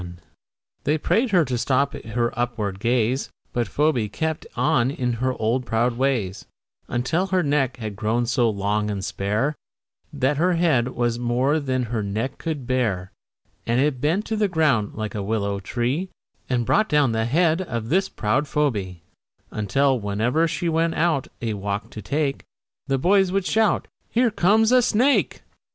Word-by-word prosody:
They 150 +2 +1
prayed 230 - +1
her 180 -6 +4
to 125 -2 -2
stop 140 +3 +1
her 120 +1 -2
upward 110 -5 -2
gaze, 120 +3 +1 0.2
But 120 -2 0
Phoebe 125 -1 +1
kept 160 +7 -3
on 125 0 +2
in 125 -3 -1
her 130 0 +1
old 115 +4 +1
proud 115 +2 +1
ways, 120 -8 -1 0.4
Until 145 +10 0
her 185 -1 +1
neck 140 -4 +1
had 110 -4 -5
grown 115 +3 0
so 120 0 +2
long 105 +1 -1
and 100 -2 -3
spare 105 +11 -1 0.6
That 140 0 0
her 180 +4 +2
head 160 -8 +2
was 120 -2 -1
more 125 +5 +1
than 130 -3 -1
her 115 -2 -2
neck 105 +6 -3
could 155 -6 -4
bear 110 -8 -1 0.6
And 120 +2 +2
it 135 -2 +1
bent 175 +8 +1
to 220 - -2
the 210 -1 +2
ground, 155 - +1
like 110 -2 -4
a 105 - -3
willow 100 -1 -1
tree, 125 - -2 0.4
And 120 -2 0
brought 215 - +2
down 145 -5 +3
the 110 0 0
head 165 +6 +2
of 115 -10 -4
this 190 +5 +2
proud 115 +7 0
Phoebe, 100 - -1 0.5
Until 130 +6 +1
whenever 110 +10 +1
she 170 +2 -2
went 165 0 +1
out 155 -5 +1 0.2
a 115 -2 -1
walk 100 +1 -4
to 110 - -7
take, 140 +1 -1 0.4
The 135 -1 +1
boys 190 +5 +3
would 195 -1 0
shout, 220 +1 +2 0.2
"Here 240 0 +2
comes 215 +4 +3
a 255 0 +6
snake!" 250 +4 +2
130 Hz, 170 wpm, -23 LUFS, 110-160 Hz, 0.6 s, a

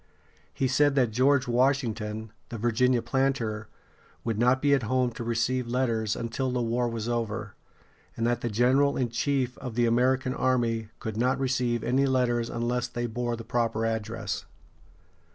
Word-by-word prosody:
He 135 - 0
said 145 +2 +3
that 125 -5 +3
George 130 +3 +3
Washington, 115 -4 0 0.2
the 115 - -5
Virginia 120 +2 +2
planter, 115 -4 -1 0.6
would 115 -2 -2
not 125 +2 +4
be 145 +1 +3
at 140 - +3
home 125 +2 +1
to 120 - -6
receive 120 +2 0
letters 115 -3 0
until 120 +3 -2
the 125 0 -1
war 120 +1 0
was 115 -1 -4
over, 110 -3 -2 0.6
and 115 - 0
that 120 0 +1
the 120 - -1
general 130 +6 +3
in 125 -2 0
chief 130 +1 -1
of 125 -4 -6
the 120 0 +3
American 130 +2 +2
army 120 -5 0
could 110 -1 -5
not 125 +3 +2
receive 125 -3 0
any 130 +3 +2
letters 120 -3 +1
unless 120 +1 -1
they 120 0 -3
bore 120 +1 -2
the 115 - -8
proper 115 -1 0
address. 110 -4 -3
120 Hz, 165 wpm, -27 LUFS, 115-130 Hz, 0.6 s, not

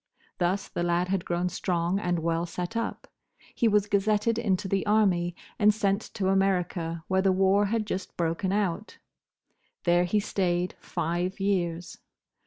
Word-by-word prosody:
Thus 190 +3 0
the - - -4
lad 175 +1 +1
had 190 -2 -1
grown 175 +1 0
strong 180 +1 -1
and 175 -3 0
well 165 +1 0
set 180 +5 -5
up. 230 - -3 0.5
He 235 - +2
was 210 -2 +3
gazetted 210 +2 +1
into 195 -4 0
the 195 0 0
Army, 185 -5 +2 0.2
and 210 0 +6
sent 200 -1 0
to 190 -2 0
America, 180 -4 0
where 190 0 +2
the 190 0 +3
war 195 +2 +3
had 220 +1 0
just 190 -2 -5
broken 170 +3 0
out. 200 0 -1 0.9
There 175 0 +3
he 210 +4 +1
stayed 180 -3 -1
five 175 +4 -2
years. 180 -3 -1
190 Hz, 155 wpm, -27 LUFS, 175-205 Hz, 0.9 s, and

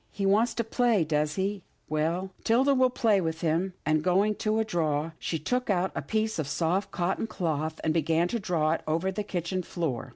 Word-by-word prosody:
He 200 - -3
wants 215 +5 +3
to 235 - 0
play, 230 -4 +2
does 150 -1 0
he 195 +1 -1
— - - -42
well, 165 +5 -1
'Tilda 260 +5 +4
will 260 -1 +4
play 220 -5 +2
with 160 -1 -3
him," 170 +3 0
and, 155 0 +2
going 195 +4 +3
to 215 -1 0
a 220 - +1
drawer, 160 -4 -1
she 165 - -2
took 250 - -2
out 190 -1 +1
a - - -3
piece 220 -3 -1
of 150 - -1
soft 175 +6 0
cotton 190 +5 -1
cloth, 160 -5 -2
and 160 - +1
began 165 +1 +2
to 235 - -1
draw 165 -6 +1
it 165 - 0
over 165 +5 0
the 190 - -3
kitchen 185 -2 -2
floor. 165 -9 -3
180 Hz, 215 wpm, -28 LUFS, 160-210 Hz, -, Tilda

